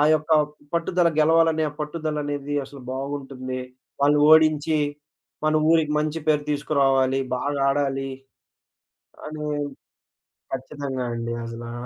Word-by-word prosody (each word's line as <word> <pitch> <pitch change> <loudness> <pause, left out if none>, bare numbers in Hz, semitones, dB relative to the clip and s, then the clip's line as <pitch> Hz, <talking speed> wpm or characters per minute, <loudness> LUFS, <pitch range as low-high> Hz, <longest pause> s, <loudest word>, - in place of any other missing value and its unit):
ఆ! - - +5
యొక్క 155 +1 -2 0.4
పట్టుదల 170 +1 +2
గెలవాలనే 160 0 +4
ఆ - - -14
పట్టుదలనేది 150 -2 -3
అసలు 140 0 -12
బాగుంటుంది. 135 -1 -5 0.4
వాళ్ళు 145 +1 +5
ఓడించి, 155 0 +5 0.7
మన 155 - +2 0.2
ఊరికి 155 -2 +3
మంచి 155 +1 -2
పేరు 150 -1 +3
తీసుకురావాలి, 135 -2 +2 0.2
బాగా 140 +2 -2
ఆడాలి 135 -1 -1 1.2
అని 155 0 -6 1.1
ఖచ్చితంగా 135 -1 -4
అండి 115 0 -3
అసలా 115 0 -7
145 Hz, 105 wpm, -24 LUFS, 135-155 Hz, 1.2 s, ఆ